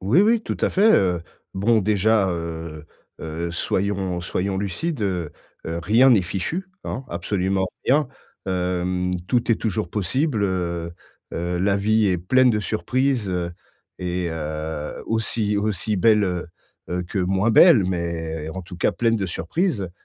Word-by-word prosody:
Oui 105 - +4
oui, 225 +2 +4
tout - - -4
à - - +2
fait, 215 +3 +5
heu, 90 -3 +2 0.3
bon, 110 +3 +3
déjà, 105 0 +2
heu 80 -2 -5 0.3
heu, 80 +2 -4
soyons 95 0 -1
soyons 95 +2 -2
lucides, 105 - -2
heu 90 -6 -1 0.4
heu, 85 +1 -3
rien 115 +8 +5
n'est 105 -6 +5
fichu, 130 - -3 0.2
hein, 130 - -4
absolument 95 +2 -1 0.2
rien. 140 +1 +3 0.4
Hem, 90 0 -1
tout 120 -1 +1
est - - +2
toujours 95 -6 -2
possible, 110 - 0
heu 85 -3 -2 0.4
heu, 85 +1 -2
la 100 +2 +2
vie 110 +1 +2
est 90 -2 +1
pleine 130 +8 +4
de 105 -2 0
surprises 120 0 0 0.7
et 90 -1 -2
heu, 75 -1 -4
aussi 110 -2 0
aussi 105 0 -1
belles, 105 +2 +4
heu 90 -2 -2 0.4
heu, 90 +1 -2
que 95 +3 -4
moins 95 +4 +1
belles 115 - +7
mais 80 -3 -3
en 95 - -5
tout 90 +1 -10
cas, - - +2
pleine 115 -1 +1
de 95 - -2
surprises. 95 - -1
95 Hz, 155 wpm, -23 LUFS, 85-110 Hz, 0.7 s, belles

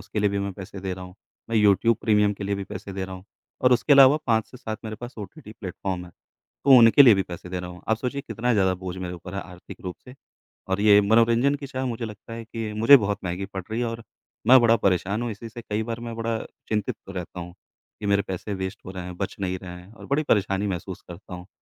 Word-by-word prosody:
उसके 105 +2 -4
लिए 105 -1 +2
भी 100 - -1
मैं 100 0 -2
पैसे 95 0 -9
दे 95 -1 -3
रहा 90 0 -8
हूँ। 90 0 -12 0.4
मैं 115 - +1
यूट्यूब 105 +2 +4
प्रीमियम 105 -1 +3
के 100 - -6
लिए 100 0 0
भी 100 - -4
पैसे 100 - -8
दे 95 0 -3
रहा 95 0 -7
हूँ, 95 +1 -11 0.4
और 125 - +5
उसके 125 +4 +3
अलावा 140 +1 +8
5 110 -2 +2
से 125 - -11
7 110 -4 -5
मेरे 110 -1 -5
पास 120 +1 -8
ओटीटी 105 +1 -9
प्लेटफ़ॉर्म 95 -1 -4
हैं, 85 - -14 0.5
तो 140 - +3
उनके 115 +5 +8
लिए 120 -5 +8
भी 95 - +1
पैसे 90 +1 -8
दे 90 -1 -3
रहा 90 0 -7
हूँ, 90 - -12
आप 110 - +3
सोचिए, 135 +3 -3
कितना 115 +2 0
ज़्यादा 95 -2 +3
बोझ 95 0 -6
मेरे 90 -1 -5
ऊपर 90 +2 -9
है 100 - -2
आर्थिक 90 -1 -12
रूप 90 - -5
से। 125 - -12 0.5
और 95 +1 0
ये 105 -1 +7
मनोरंजन 115 +6 +4
की 140 -1 -8
चाह, 130 -1 -4
मुझे 115 -1 -3
लगता 105 +1 -9
है 115 0 -7
कि 115 -1 -5
मुझे 115 +6 +9
बहुत 100 -3 -1
महँगी 90 +2 -3
पड़ 95 - -3
रही 115 +2 -1
है 120 - 0
और 115 0 -5 0.5
मैं 130 0 +9
बड़ा 115 0 +5
परेशान 100 +2 0
हूँ 120 - -2
इसी 110 +2 -7
से, 120 +2 -9
कई 105 +1 0
बार 115 0 -4
मैं 120 -1 -6
बड़ा 115 0 -1 0.3
चिंतित 105 -2 -1
रहता 90 -2 -6
हूँ, 85 0 -8 0.5
कि 105 - -4
मेरे 100 0 +3
पैसे 95 +2 -4
वेस्ट 95 +1 -4
हो 95 - -6
रहे 95 -2 -6
हैं, 90 -1 -7
बच 100 - -3
नहीं 95 -1 -2
रहे 90 - -8
हैं 95 +4 -16
और - - -12
बड़ी 140 +3 +1
परेशानी 100 -1 +2
महसूस 95 -1 -5
करता 90 +1 -9
हूँ। 90 +1 -9
105 Hz, 260 wpm, -25 LUFS, 95-115 Hz, 0.5 s, मुझे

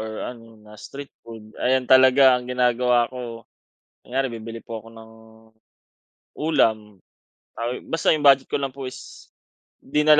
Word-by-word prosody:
or 110 0 -5
ano, 115 -2 -16
na 105 - -15
street 140 0 -10
food 110 -2 -12
ayan, 130 0 +2
talaga 130 +1 +6
ang 125 0 -1
ginagawa 125 -1 +2
ko, 115 -3 -8 0.6
kunyare, 130 +1 -1
bibili 115 0 -8
po 115 -1 -7
ako 115 +1 -14
ng 110 0 -13 1.3
ulam. 110 -9 +1 0.7
Ay 120 +2 -4
basta 165 - -2
'yong 155 -2 +3
budget 135 -1 +5
ko - - -1
lang 135 -2 -3
po 135 -1 -7
is 130 - -12 0.5
'di 150 +2 -1
na 150 0 +6
125 Hz, 155 wpm, -23 LUFS, 115-135 Hz, 1.3 s, talaga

